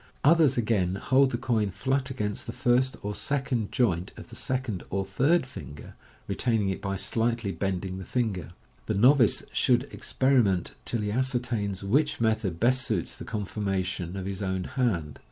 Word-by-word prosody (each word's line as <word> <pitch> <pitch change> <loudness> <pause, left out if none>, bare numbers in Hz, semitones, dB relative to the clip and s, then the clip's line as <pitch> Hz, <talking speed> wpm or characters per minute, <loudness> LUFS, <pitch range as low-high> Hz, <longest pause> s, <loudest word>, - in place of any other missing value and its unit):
Others, 150 -3 +5
again, 105 -6 +1
hold 130 +7 +3
the 120 - -2
coin 110 -5 0
flat 130 +7 -1
against 105 -6 -3
the - - -3
first 125 +2 +2
or 105 +1 -2
second 130 -4 -1
joint 95 -7 0
of - - -10
the - - -10
second 130 -7 -2
or 95 0 -1
third 135 - +2
finger, 70 - -10 0.3
retaining 110 -5 +1
it 95 - -3
by 100 -1 -2
slightly 115 +2 0
bending 95 +1 -3
the - - -6
finger. 105 - -2 0.4
The - - 0
novice 125 0 +5
should 125 0 +3
experiment 120 -9 +2
till 115 - -1
he 105 0 -2
ascertains 120 -5 -1
which 145 +8 +1
method 110 -7 0
best 130 +4 +3
suits 105 -9 -1
the - - -8
conformation 95 -3 -3
of 95 - -4
his 100 +1 -4
own 95 -1 -1
hand. 90 - -1
110 Hz, 165 wpm, -27 LUFS, 95-130 Hz, 0.4 s, Others